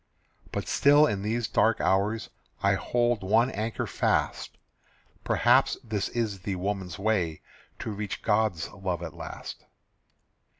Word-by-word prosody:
But - - -3
still 145 +2 +5
in 100 -9 -1
these 110 +2 -1
dark 115 0 +2
hours 105 +3 +1 0.3
I - - +4
hold 120 -2 +1
one 115 +6 +3
anchor 110 +1 -3
fast: - - -1 0.7
Perhaps - - +3
this 110 -4 -2
is 110 -5 -2
the 95 +1 -3
woman's 95 -2 -3
way 95 -6 0 0.4
To 110 - -4
reach 105 -1 -5
God's 105 -6 +1
love 90 -3 -3
at 80 - -6
last. - - -8
105 Hz, 130 wpm, -27 LUFS, 95-115 Hz, 0.7 s, still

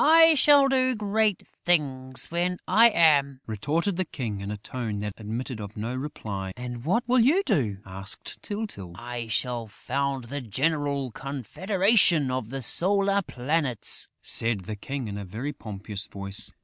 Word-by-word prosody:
"I 325 +1 +8
shall 285 -1 +6
do 260 -1 +2
great 210 -1 +1
things 130 -7 -1
when 175 +1 0
I 225 +5 +7
am!" 145 - +3
retorted 155 - -1
the 185 - +1
King, 115 - -5
in 100 - -5
a 105 - -4
tone 110 0 -4
that 105 -1 -3
admitted 115 +3 -5
of 105 0 -8
no 115 +4 -3
reply. 105 -8 -5
"And 125 -1 -6
what 230 - +1
will 250 +1 +4
you 300 +12 +4
do?" 110 - 0
asked 95 +1 -6
Tyltyl. 205 - -5
"I 120 +1 -6
shall 120 0 -1
found 135 +4 -2
the 140 +4 -5
General 140 +2 -1
Confederation 170 - +2
of 125 -4 -3
the 135 0 -4
Solar 200 - +2
Planets," 135 - -1 0.2
said 115 -3 +1
the 105 +4 -6
King, 135 +4 -5
in 100 0 -5
a - - -5
very 115 +10 -5
pompous 105 -4 -2
voice. 100 -1 -2
135 Hz, 160 wpm, -26 LUFS, 110-180 Hz, 0.2 s, I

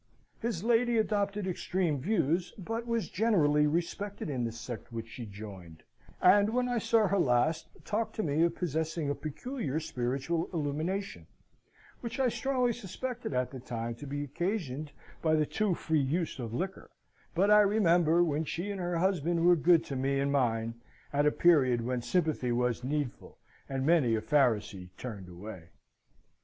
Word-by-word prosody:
His 220 -6 -2
lady 235 +1 +3
adopted 205 -2 0
extreme 180 -4 -1
views, 175 +1 0
but 225 +5 -4
was 230 -2 0
greatly 155 -9 +3
respected 170 +3 -2
in 125 -3 -1
the 115 - -2
sect 115 +1 -8
which 115 -1 -5
she 115 0 -7
joined; 95 -6 -10 0.4
and 205 +1 +6
when 250 +2 +1
I 245 -1 0
saw 225 0 +3
her 200 +1 +1
last, 155 +3 +2 0.2
talked 220 +2 -2
to 215 - -1
me 150 +1 +1
of 170 0 +2
possessing 160 -2 -1
a - - +1
peculiar 155 - -4
spiritual 135 +4 -2
illumination, 155 - -2 0.7
which 235 +2 -5
I 260 -2 +3
strongly 250 -1 0
suspected 240 - -5
at 125 0 0
the 130 - -7
time 115 -1 -4
to 145 - -8
be 145 +1 -3
occasioned 155 -2 -3 0.3
by 160 -1 +3
the 155 -1 +2
too 205 +2 0
free 160 -3 +1
use 155 +3 -1
of 115 -3 -4
liquor: 185 +10 -4 0.5
but 195 +4 +3
I 210 - +8
remember 175 -5 +4
when 155 -2 0
she 175 +6 -3
and 195 -2 -4
her 175 -1 -1
husband 170 -2 +1
were 175 0 +7
good 170 +1 +4
to 140 - -5
me 135 +1 0
and 140 0 +1
mine, 115 -4 0 0.3
at 145 +1 +3
a - - +4
period 135 -10 +4
when 125 0 -1
sympathy 140 -1 0
was 120 0 0
needful, 145 -1 -3 0.3
and 135 -1 -2
many 150 -8 +4
a 110 - -1
Pharisee 110 -9 +1
turned 100 -7 -7
away. 90 -1 -9
155 Hz, 170 wpm, -30 LUFS, 125-195 Hz, 0.7 s, I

